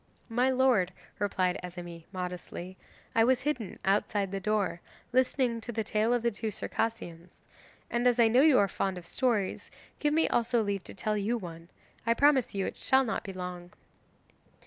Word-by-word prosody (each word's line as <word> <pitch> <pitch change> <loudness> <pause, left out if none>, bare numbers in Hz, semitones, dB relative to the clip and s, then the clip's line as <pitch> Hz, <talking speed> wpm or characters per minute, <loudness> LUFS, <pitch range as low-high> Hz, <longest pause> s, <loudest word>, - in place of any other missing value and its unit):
'My 245 +3 +2
lord,' 250 -9 +3 0.3
replied 185 -3 0
Azemi, 175 -2 -8
modestly, 180 0 -6 0.4
'I 225 - +5
was 250 +1 +3
hidden 260 -7 -2
outside 200 0 +1
the 195 - -2
door, 205 -3 0 0.3
listening 255 -2 +2
to 240 - -5
the 220 -1 -1
tale 215 +2 +1
of 245 -1 +1
the 235 - +2
two 215 +1 -3
Circassians. 180 -6 -4 0.5
And 240 +1 +1
as 245 0 +3
I 230 - +7
know 245 +4 +5
you 295 -3 +6
are 200 - +4
fond 190 0 -2
of 175 - -9
stories, 220 -2 -1 0.3
give 295 0 +1
me 325 - +4
also 235 -1 +2
leave 200 -2 -2
to - - -7
tell 210 +2 -1
you 215 +4 0
one. 170 -4 -9 0.3
I 230 0 +2
promise 275 -5 +3
you 195 -1 0
it - - -5
shall 265 0 +3
not 225 - -2
be 195 - -6
long. 180 -1 -7
215 Hz, 180 wpm, -30 LUFS, 185-245 Hz, 0.5 s, I